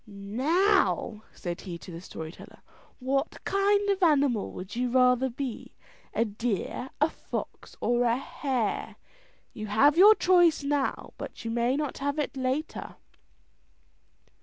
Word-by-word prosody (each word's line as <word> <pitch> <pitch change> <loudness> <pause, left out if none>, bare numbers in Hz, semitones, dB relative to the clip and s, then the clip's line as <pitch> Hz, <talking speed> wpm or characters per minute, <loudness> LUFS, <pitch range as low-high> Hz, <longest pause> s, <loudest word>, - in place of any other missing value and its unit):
"Now," 235 - +1
said 175 -1 -6
he 175 -3 -6
to 165 +3 -11
the 165 0 -8
story 160 -3 -7
teller, - - -14 0.4
"what 275 +3 -1
kind 405 +1 +2
of 390 0 -1
animal 285 - +3
would 185 +4 -8
you 250 +1 0
rather 250 +1 +4
be, 250 -1 -6 0.4
a 230 - +1
deer, 225 +3 -3
a 300 - +4
fox, - - -7
or 240 0 +1
a 235 0 +2
hare? 260 -4 -2 0.6
You 215 -2 -6
have 280 +10 +4
your 420 +3 +9
choice 350 -6 +4
now, 280 -1 -1
but - - -8
you 225 - -2
may 240 +2 +1
not 295 -1 -3
have 285 +2 -1
it 295 - -2
later." 265 +4 -3
260 Hz, 140 wpm, -28 LUFS, 225-300 Hz, 0.6 s, your